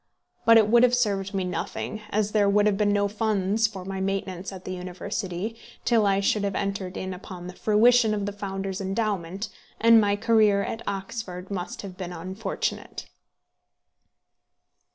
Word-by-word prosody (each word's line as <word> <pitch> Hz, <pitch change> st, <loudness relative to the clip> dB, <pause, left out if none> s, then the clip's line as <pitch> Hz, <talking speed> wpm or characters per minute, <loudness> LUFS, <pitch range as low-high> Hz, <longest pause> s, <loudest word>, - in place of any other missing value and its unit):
But 230 Hz, 0 st, +8 dB
it 220 Hz, -2 st, +5 dB
would 235 Hz, +2 st, +5 dB
have 250 Hz, 0 st, +5 dB
served 200 Hz, -5 st, 0 dB
me 195 Hz, -2 st, -1 dB
nothing, 180 Hz, +4 st, -4 dB
as 210 Hz, 0 st, 0 dB
there 205 Hz, -2 st, +3 dB
would 205 Hz, +1 st, +4 dB
have 210 Hz, -2 st, +3 dB
been 205 Hz, 0 st, +2 dB
no 205 Hz, 0 st, +2 dB
funds 210 Hz, 0 st, +1 dB
for 195 Hz, -4 st, -8 dB
my 190 Hz, 0 st, -4 dB
maintenance 190 Hz, -1 st, -3 dB
at 185 Hz, -1 st, -10 dB
the 185 Hz, -, -4 dB
University 185 Hz, +3 st, -4 dB, 0.3 s
till 225 Hz, -4 st, +4 dB
I 195 Hz, 0 st, +2 dB
should 200 Hz, +1 st, +1 dB
have 200 Hz, -1 st, -1 dB
entered 195 Hz, -2 st, -3 dB
in 185 Hz, 0 st, -4 dB
upon 180 Hz, -1 st, -9 dB
the 180 Hz, -, -7 dB
fruition 220 Hz, +2 st, +4 dB
of 205 Hz, -1 st, -2 dB
the 205 Hz, -, -2 dB
founder's 195 Hz, -1 st, -4 dB
endowment, 195 Hz, -1 st, -2 dB, 0.3 s
and 230 Hz, 0 st, +7 dB
my 205 Hz, -1 st, +2 dB
career 215 Hz, -2 st, +3 dB
at 225 Hz, -, -4 dB
Oxford 195 Hz, -2 st, -5 dB
must 185 Hz, 0 st, -4 dB
have 185 Hz, -2 st, -8 dB
been 180 Hz, -2 st, -5 dB
unfortunate. 185 Hz, +6 st, -4 dB
200 Hz, 170 wpm, -26 LUFS, 190-215 Hz, 0.3 s, But